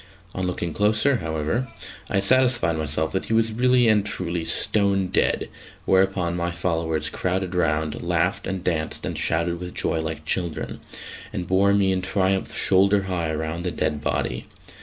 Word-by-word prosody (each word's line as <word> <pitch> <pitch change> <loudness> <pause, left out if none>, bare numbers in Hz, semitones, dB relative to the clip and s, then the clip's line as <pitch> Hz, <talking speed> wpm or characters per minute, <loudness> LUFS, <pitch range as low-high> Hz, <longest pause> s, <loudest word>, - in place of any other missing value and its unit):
On 95 0 -2
looking 85 -2 -3
closer, 110 +6 +2
however, 80 +9 -2 0.4
I 100 - +1
satisfied 120 -6 +3
myself 80 0 -1
that 95 - -2
he - - -2
was 115 0 +2
really 125 +1 +3
and 105 -2 +4
truly 90 -4 -3
stone 100 -1 +3
dead, - - +1 0.4
whereupon 95 -2 +2
my 85 0 -1
followers 80 -3 -1
crowded 90 +3 -2
round, 80 -3 0
laughed - - 0
and 95 -1 -3
danced 80 -4 -2
and - - -3
shouted 85 +1 0
with 90 0 -7
joy 80 - 0
like 80 -1 -4
children, 85 -1 -2 0.5
and 90 - -4
bore 95 +2 +3
me 100 -1 +3
in 95 -1 0
triumph 95 0 0
shoulder 100 +1 +4
high 90 -4 -2
round 80 +2 -3
the 90 - 0
dead 75 -3 -1
body. - - -2
90 Hz, 160 wpm, -23 LUFS, 80-100 Hz, 0.5 s, and